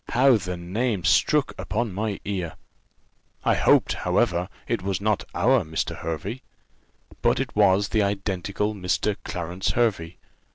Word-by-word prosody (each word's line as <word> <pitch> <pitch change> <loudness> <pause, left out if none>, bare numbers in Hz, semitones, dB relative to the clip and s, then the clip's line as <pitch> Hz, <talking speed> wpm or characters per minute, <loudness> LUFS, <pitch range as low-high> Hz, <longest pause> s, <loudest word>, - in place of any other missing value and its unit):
how 130 +2 +5
the 90 -4 -3
name 100 +3 -2
struck 65 -2 +3
upon 110 -2 -2
my 105 +1 -2
ear! 90 -5 -3 0.9
I - - +4
hoped, - - +4
however, 90 -1 0 0.2
it 115 -4 -1
was 95 -1 -2
not 105 0 0
our 130 -2 +3
Mr. 80 0 -3
Hervey; 90 - -4 0.8
but - - +2
it - - -3
was 100 -1 +4
the 110 - +2
identical 100 +1 -1
Mr. 100 +1 0
Clarence 90 0 -3
Hervey. 95 -8 0
100 Hz, 135 wpm, -25 LUFS, 90-110 Hz, 0.9 s, how